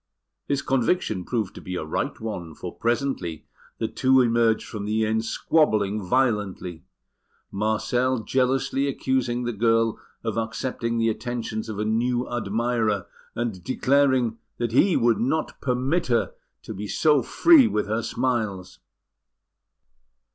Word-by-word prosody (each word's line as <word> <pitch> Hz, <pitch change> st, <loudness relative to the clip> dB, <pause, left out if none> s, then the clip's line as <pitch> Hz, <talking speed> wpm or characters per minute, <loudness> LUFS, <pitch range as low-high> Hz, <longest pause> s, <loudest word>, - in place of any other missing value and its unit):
His 140 Hz, -1 st, 0 dB
conviction 125 Hz, -, 0 dB
proved 110 Hz, -6 st, -2 dB
to -, -, -10 dB
be 90 Hz, -, -5 dB
a 80 Hz, -, -3 dB
right 80 Hz, -, -3 dB
one, 90 Hz, -8 st, -6 dB
for -, -, -7 dB
presently 115 Hz, -, -2 dB, 0.3 s
the -, -, -1 dB
two 130 Hz, 0 st, +3 dB
emerged 115 Hz, -2 st, +2 dB
from 105 Hz, -2 st, -5 dB
the 110 Hz, +1 st, +1 dB
inn 110 Hz, +1 st, +1 dB
squabbling 110 Hz, -5 st, +1 dB
violently, 100 Hz, -6 st, -1 dB, 0.7 s
Marcel 110 Hz, +4 st, 0 dB
jealously 135 Hz, +3 st, +1 dB
accusing 130 Hz, -3 st, -1 dB
the 120 Hz, 0 st, -2 dB
girl 115 Hz, +1 st, +2 dB, 0.2 s
of 115 Hz, -1 st, -2 dB
accepting 115 Hz, +1 st, -2 dB
the 115 Hz, 0 st, +2 dB
attentions 115 Hz, -1 st, -4 dB
of 105 Hz, -, -5 dB
a 105 Hz, -, -1 dB
new 120 Hz, +3 st, 0 dB
admirer, 115 Hz, -3 st, -1 dB, 0.3 s
and 115 Hz, -7 st, -3 dB
declaring 130 Hz, -3 st, +2 dB, 0.2 s
that 120 Hz, -1 st, -2 dB
he 175 Hz, -, +4 dB
would 115 Hz, -1 st, +3 dB
not 155 Hz, +6 st, -1 dB
permit 135 Hz, +6 st, 0 dB
her 120 Hz, -2 st, +1 dB, 0.3 s
to -, -, -7 dB
be 105 Hz, +2 st, -6 dB
so 150 Hz, +4 st, +3 dB
free 295 Hz, -, +6 dB
with 105 Hz, -, 0 dB
her 110 Hz, +2 st, -1 dB
smiles. 110 Hz, -7 st, -2 dB
115 Hz, 135 wpm, -24 LUFS, 110-130 Hz, 0.7 s, free